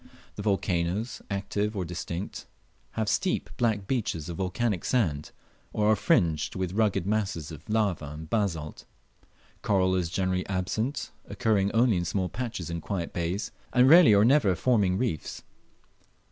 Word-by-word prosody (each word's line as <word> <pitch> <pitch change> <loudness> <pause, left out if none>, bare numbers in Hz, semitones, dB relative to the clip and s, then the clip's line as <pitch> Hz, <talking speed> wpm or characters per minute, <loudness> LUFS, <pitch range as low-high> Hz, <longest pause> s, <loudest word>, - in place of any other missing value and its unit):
The - - -5
volcanoes, 100 +1 -1
active 100 +1 -2
or 95 - -1
extinct, 90 +2 -5 0.5
have 110 -1 -1
steep 185 - 0
black 110 -5 +1
beaches 95 - -2
of 85 - -5
volcanic 95 +1 -1
sand, 80 - 0 0.4
or 105 0 +3
are - - +5
fringed 85 - +1
with 95 -1 -2
rugged 105 -4 +1
masses 100 -7 -1
of 80 +4 -11
lava 105 -7 0
and 75 +2 -8
basalt. 85 -6 -2 0.8
Coral 95 -2 +2
is 90 -3 0
generally 95 0 0
absent, 110 +8 -2
occurring 100 -3 +1
only 115 -3 +3
in 85 - -1
small 90 +1 -1
patches 110 -6 -4
in 85 0 -4
quiet 90 -1 -4
bays, 90 +4 -2 0.2
and 125 +1 +5
rarely 160 -8 +8
or 100 +1 +5
never 120 -8 +4
forming 100 -5 +2
reefs. 115 -10 -3
100 Hz, 145 wpm, -27 LUFS, 85-110 Hz, 0.8 s, rarely